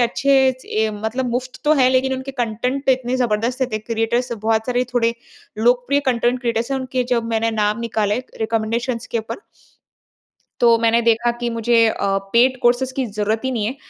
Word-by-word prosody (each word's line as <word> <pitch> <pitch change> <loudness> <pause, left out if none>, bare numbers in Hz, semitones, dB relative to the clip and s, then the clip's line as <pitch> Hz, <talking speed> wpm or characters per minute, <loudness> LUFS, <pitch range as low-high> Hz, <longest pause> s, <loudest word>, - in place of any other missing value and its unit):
अच्छे 275 +3 +1 0.5
ऐ 220 0 +2
मतलब 225 +4 -3
मुफ़्त 250 +1 -4
तो 300 - +4
हैं। 260 -3 +4
लेकिन 265 +1 +2
उनके 260 +1 -6
कंटेंट 250 +2 -2
तो 265 - +6
इतने 255 0 -2
जबरदस्त 245 +1 0
थे 215 - 0
क्रिएटर्स 230 +3 -1
बहुत 220 0 -1
सारे 250 0 0
थोड़े 230 -1 +2 0.4
लोकप्रिय 245 +5 +2
कंटेंट 245 0 +1
क्रिएटर्स 235 0 -1
हैं। 270 - 0
उनके 255 -1 -2
जब 235 -2 +1
मैंने 225 0 +1
नाम 210 +1 0
निकाले, 215 -2 -1 0.2
रिकमेंडेशंस 230 +2 -2
के 235 - -2
ऊपर। 220 - -6 1.2
तो 235 -1 +5
मैंने 230 0 +3
देखा 235 +1 +2
कि 240 -1 -1
मुझे 230 0 +3
अ, 200 -2 0 0.2
पेड 255 +2 +4
कोर्सेंज़ 245 +2 +2
की 265 - -1
ज़रूरत 215 0 -2
ही 260 - 0
नहीं 225 -5 -1
है। 245 +5 -3
235 Hz, 180 wpm, -20 LUFS, 225-255 Hz, 1.2 s, तो